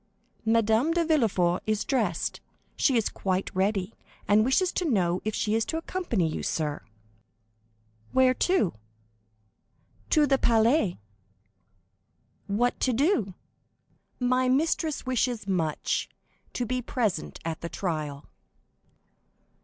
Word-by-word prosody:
"Madame 225 +5 +3
de 340 -1 +1
Villefort 200 - +2
is 215 -1 0
dressed; 270 -2 -1 0.3
she 265 -4 +2
is 225 - +1
quite 190 -1 -2
ready, 195 +1 0 0.3
and 210 +1 +5
wishes 265 +10 +2
to - - -2
know 185 - +1
if 215 0 -2
she 215 -2 0
is 225 0 +2
to 320 - -3
accompany 325 - -1
you, 155 - -3
sir?" 150 -2 -2 1.3
"Where 260 -1 +4
to?" 355 - +1 1.4
"To 305 -2 +4
the 270 -1 +2
Palais." 225 - +3 1.5
"What 235 +5 0
to 255 - +1
do?" 240 - +1 0.8
"My 255 0 +2
mistress 315 +3 0
wishes 245 -4 -1
much 165 -6 -1 0.4
to 245 - -2
be 255 +2 -2
present 220 -9 -2
at 165 -1 -4
the 170 - -4
trial." 155 -7 -4
225 Hz, 115 wpm, -27 LUFS, 190-260 Hz, 1.5 s, and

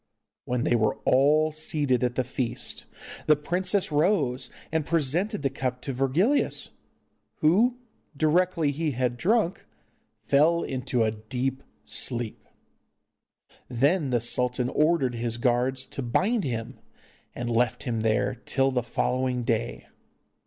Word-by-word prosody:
When 125 -1 -1
they 120 - +2
were 110 -2 +2
all 150 +4 +4
seated 145 -4 0
at 120 -1 0
the 130 - +1
feast 125 -1 -3 0.4
the 155 - +6
princess 180 +5 0
rose 150 -5 +1 0.2
and 160 -1 +1
presented 165 - 0
the 135 - +1
cup 130 -2 -3
to 135 - -3
Virgilius, 155 - +1 0.7
who 220 +11 +4 0.4
directly 165 0 +2
he 155 +1 -2
had 125 0 0
drunk 190 - +1 0.6
fell 160 +4 +3
into 130 -2 -1
a 110 - +1
deep 125 +5 -3 0.2
sleep. 120 -3 -2 1.2
Then 140 +5 +2
the 120 -2 +1
sultan 125 +1 0
ordered 150 -4 +2
his 120 0 -2
guards 125 +2 +1
to - - -6
bind 190 - +1
him, 115 -4 -4 0.6
and 120 - -4
left 120 +1 +1
him 115 -3 -2
there 110 -1 +1
till 135 -1 0
the 125 -1 0
following 125 +1 -1
day. 115 -1 -2
135 Hz, 130 wpm, -26 LUFS, 125-155 Hz, 1.2 s, the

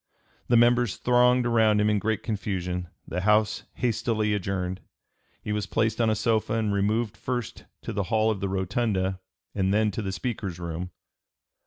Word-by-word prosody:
The 120 - +4
members 120 -2 +3
thronged 125 0 +3
around 110 -3 +3
him 105 - +3
in 105 -1 +2
great 110 +1 -1
confusion. 90 -5 -3 0.2
The 90 - -3
House 105 +1 +2
hastily 110 -3 0
adjourned. 95 -2 -2 0.6
He 105 - -3
was 105 -1 -1
placed 110 +1 0
on 115 - +3
a 110 - +2
sofa 110 0 0
and 110 -2 0
removed 105 +2 0
first 125 -3 -4 0.2
to - - -4
the 100 - -1
hall 110 -1 +3
of 105 - -3
the 100 - -2
rotunda 95 0 -1 0.3
and 95 -1 +1
then 105 +1 +2
to 110 - -4
the 95 -2 -3
Speaker's 100 -5 -4
room. 85 +1 -4
105 Hz, 170 wpm, -26 LUFS, 95-115 Hz, 0.6 s, The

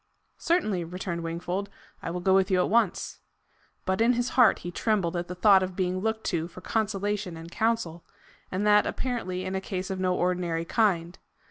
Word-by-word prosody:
"Certainly," 215 - +1
returned 175 0 -4
Wingfold; 175 +4 -3 0.3
"I - - -4
will 175 +1 -3
go 190 +1 +3
with 190 0 +4
you 190 - +3
at 180 - +1
once." 225 -5 +1 0.7
But 190 +3 0
in 235 +2 +5
his 245 +1 0
heart 245 -3 +5
he 175 - -3
trembled 190 -3 0
at 175 0 -2
the 180 - -6
thought 195 +1 +6
of 185 -1 -3
being 185 0 0
looked 220 +2 -1
to 165 -2 -1
for 175 - -12
consolation 205 -3 -2
and 165 +1 -10
counsel, 220 -7 -1 0.5
and 190 +3 -1
that 210 0 +5
apparently 185 -8 -3
in 190 - -3
a 190 - -1
case 185 -1 -4
of 190 - -3
no 185 -1 +1
ordinary 175 -2 0
kind. 180 -5 +1
185 Hz, 195 wpm, -27 LUFS, 175-210 Hz, 0.7 s, thought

